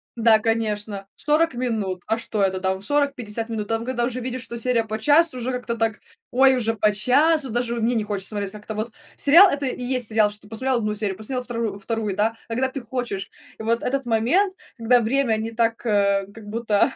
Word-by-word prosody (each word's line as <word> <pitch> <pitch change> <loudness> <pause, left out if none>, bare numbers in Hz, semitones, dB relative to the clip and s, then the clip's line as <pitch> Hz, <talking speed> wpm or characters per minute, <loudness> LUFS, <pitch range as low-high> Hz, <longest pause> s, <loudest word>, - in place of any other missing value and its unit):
Да, 225 -2 +5
конечно, 215 -3 -2
40 305 0 +2
минут. 220 -7 -2
А 225 - +1
что 220 -2 -3
это 190 -1 +1
там? 190 0 -1
40-50 245 -4 0
минут? 215 -2 -3
Там, 225 0 -1
когда 240 -1 -1
уже 250 0 -3
видишь, 255 0 -4
что 235 -1 -7
серия 235 0 +1
по 220 0 -4
часу, 295 +4 +3
уже 250 +1 -2
как-то 245 -2 -3
так: 225 -1 0 0.3
ой, 265 +1 +5
уже 225 -2 0
по 215 0 +3
часу. 270 +6 +3
Даже, 240 0 -1
ну, 235 - -3
мне 235 +2 +1
не 225 -3 0
хочется 200 -2 -2
смотреть 205 -2 -3
как-то 215 +1 -8
вот. 215 +2 -4 0.2
Сериал- 340 +7 +7
это 280 -1 -2
и 250 - -4
есть 245 -2 0
сериал, 215 -1 +3
что 210 - -10
ты 205 - -16
посмотрел 255 +3 0
1 215 -2 -2
серию, 205 -2 -1
посмотрел 250 +5 -3
втору 230 -5 -3
вторую, 215 -1 -3
да, 220 +2 +2 0.2
когда 250 +3 0
ты 270 +1 -6
хочешь. 235 -5 -4 0.3
И 220 - -6
вот 230 +1 0
этот 270 -1 -2
момент, 325 - +2 0.2
когда 235 +1 +3
время 235 -1 +1
не 225 +1 -4
так, 230 +1 -1
э, 200 -2 +2
как 220 -1 -12
будто 220 +2 +1
230 Hz, 215 wpm, -23 LUFS, 215-250 Hz, 0.3 s, Сериал